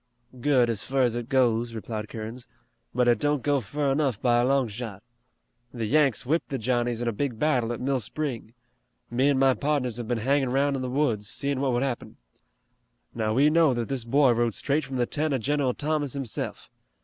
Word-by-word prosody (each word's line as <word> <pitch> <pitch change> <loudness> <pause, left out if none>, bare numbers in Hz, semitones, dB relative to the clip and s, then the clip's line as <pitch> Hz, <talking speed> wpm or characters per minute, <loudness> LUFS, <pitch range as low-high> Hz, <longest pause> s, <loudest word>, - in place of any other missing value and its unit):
"Good 130 -2 +3
as 115 -3 0
fur 135 0 +1
as 120 -2 +1
it 120 -1 -5
goes," 120 -3 +2
replied 110 -1 -5
Kerins, 115 +2 -7 0.4
"but 125 0 +1
it 120 - +4
don't 145 -2 0
go 145 -2 +2
fur 140 +6 -1
enough 135 -6 0
by 120 -1 +3
a - - +2
long 135 -1 +2
shot. 110 -2 -7 0.7
The 115 -3 -4
Yanks 140 -2 +2
whipped 160 +6 0
the 135 - -2
Johnnies 120 0 -1
in - - -2
a - - +2
big 120 +1 -3
battle 125 -4 +1
at 120 - -4
Mill 135 +1 0
Spring. 120 -2 -5 0.6
Me 130 +4 +2
an' 140 - +2
my 135 0 +4
pardners 135 -5 -1
have 120 -2 -5
been 120 0 0
hangin' 135 +3 +1
'roun' 140 +2 +1
in 135 - -3
the 130 - -3
woods, 120 -7 0
seein' 140 -1 -1
what 135 -2 +1
would 120 +2 +1
happen. 130 -4 -4 1.0
Now, 110 -1 -1
we 145 +4 +4
know 160 -5 +4
that 120 -2 -3
this 135 -4 -1
boy 135 +3 +4
rode 120 -2 +1
straight 150 +2 0
from 135 0 -6
the 125 -1 +1
tent 150 +2 0
of 130 - -2
General 140 0 0
Thomas 150 -2 -1
hisself. 135 -5 -5
125 Hz, 210 wpm, -26 LUFS, 120-140 Hz, 1.0 s, it